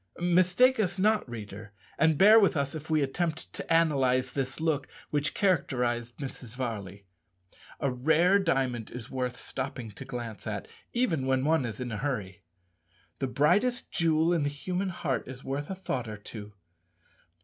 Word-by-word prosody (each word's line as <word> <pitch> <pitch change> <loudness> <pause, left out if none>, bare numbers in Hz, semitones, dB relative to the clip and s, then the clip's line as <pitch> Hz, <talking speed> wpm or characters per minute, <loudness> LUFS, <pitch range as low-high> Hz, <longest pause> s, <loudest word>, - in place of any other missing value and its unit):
Mistake 185 +9 +4
us 195 -3 +1
not, 210 - +2
reader, 105 -2 -8 0.2
and 160 -2 +3
bear 210 +6 +8
with 200 -6 +3
us 140 -1 -1
if 155 0 -7
we 155 -2 +3
attempt 160 +4 -2
to - - -6
analyze 135 -6 +3
this 135 +1 -3
look 155 -4 0 0.2
which 145 0 0
characterized 125 - 0
Mrs. 130 -4 -7
Varley. 100 -6 -5 0.7
A 140 -3 0
rare 160 +9 +4
diamond 130 - 0
is 120 -3 -8
worth 125 -2 -2
stopping 130 -4 -5
to 105 - -9
glance 120 -5 -6
at, 105 -2 -4 0.2
even 170 - 0
when 130 0 +2
one 160 -3 +3
is 110 -1 -5
in 125 -2 -4
a 110 - -3
hurry. 105 -9 -3 0.8
The 135 - 0
brightest 210 - +2
jewel 165 0 +3
in 170 - +1
the 145 - +1
human 180 +6 -3
heart 135 -7 -2
is 130 +1 -8
worth 140 +2 -3
a 190 - -3
thought 130 -10 -3
or 105 -1 -6
two. 105 0 -9
135 Hz, 165 wpm, -29 LUFS, 125-165 Hz, 0.8 s, bear